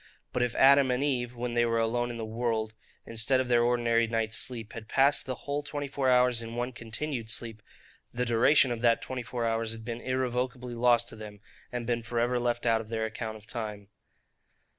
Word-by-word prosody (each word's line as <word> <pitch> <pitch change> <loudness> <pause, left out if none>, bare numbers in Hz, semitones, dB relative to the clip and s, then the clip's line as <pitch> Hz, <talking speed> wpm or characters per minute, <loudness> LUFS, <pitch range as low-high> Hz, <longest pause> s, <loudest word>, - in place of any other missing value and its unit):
But 125 - 0
if 125 -1 0
Adam 140 0 +6
and 125 +2 +1
Eve, 125 -4 -1
(when 120 0 -3
they 120 0 +3
were 115 -1 +1
alone 120 +2 0
in 120 - -5
the 115 - -4
world,) 110 -1 -2 0.3
instead 115 +3 +1
of 130 -1 -1
their 120 -1 +4
ordinary 120 -1 +2
night's 115 -1 0
sleep, 115 -4 -1
had 115 -2 -8
passed 140 +4 +3
the 130 - -2
whole 145 +1 -1
twenty 145 0 -5
four 135 -1 0
hours 125 -1 +4
in 115 0 -7
one 120 +1 -2
continued 115 +1 -4
sleep, 115 -1 -3 0.5
the 125 +1 -2
duration 120 +3 +4
of 115 -1 -3
that 115 -1 +3
twenty 130 -1 -4
four 120 0 -3
hours 115 0 -1
had 115 -1 -10
been 120 0 -5
irrecoverably 125 -1 -2
lost 120 0 +3
to - - -8
them, 105 -1 -10 0.3
and 120 -1 -4
been 120 0 -1
for 115 +1 -3
ever 120 +1 +1
left 120 0 -1
out 115 -1 +3
of 110 - -12
their 110 -1 -1
account 110 0 -5
of 110 - -17
time. 105 -3 -6
120 Hz, 215 wpm, -29 LUFS, 115-125 Hz, 0.5 s, Adam